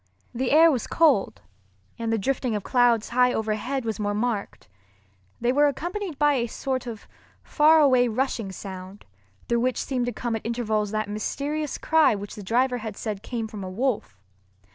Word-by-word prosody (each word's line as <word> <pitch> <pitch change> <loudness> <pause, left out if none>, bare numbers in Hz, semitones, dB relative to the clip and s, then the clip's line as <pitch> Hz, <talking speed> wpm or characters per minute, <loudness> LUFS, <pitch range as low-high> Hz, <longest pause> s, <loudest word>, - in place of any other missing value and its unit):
The 250 +2 -1
air 320 +3 +7
was 255 -6 -2
cold, 265 - +2 0.6
and 230 -1 -2
the 225 - +2
drifting 250 +1 -1
of 205 - -3
clouds 240 -3 +2
high 250 +1 +3
overhead 225 +4 -2
was 220 -3 -3
more 205 0 -1
marked. 215 - -3 0.7
They 240 +1 +1
were 290 +2 +4
accompanied 345 +4 -4
by 295 0 +4
a 240 -3 0
sort 255 +2 -3
of 225 -3 -8 0.4
far 315 +1 +5
away 255 -4 +5
rushing 230 -3 -2
sound, 190 +1 -9 0.4
through 235 0 +1
which 255 +1 0
seemed 250 -3 -2
to - - 0
come 240 -1 -3
at 220 - -4
intervals 220 -3 -1
that 215 0 -2
mysterious 285 +8 -3
cry 320 -7 +3
which 205 0 -7
the 215 - -8
driver 245 +5 +1
had 220 -2 -6
said 210 -3 -4
came 230 -2 -4
from 215 -3 -8
a 185 - -5
wolf. 205 - -2
240 Hz, 180 wpm, -25 LUFS, 215-270 Hz, 0.7 s, air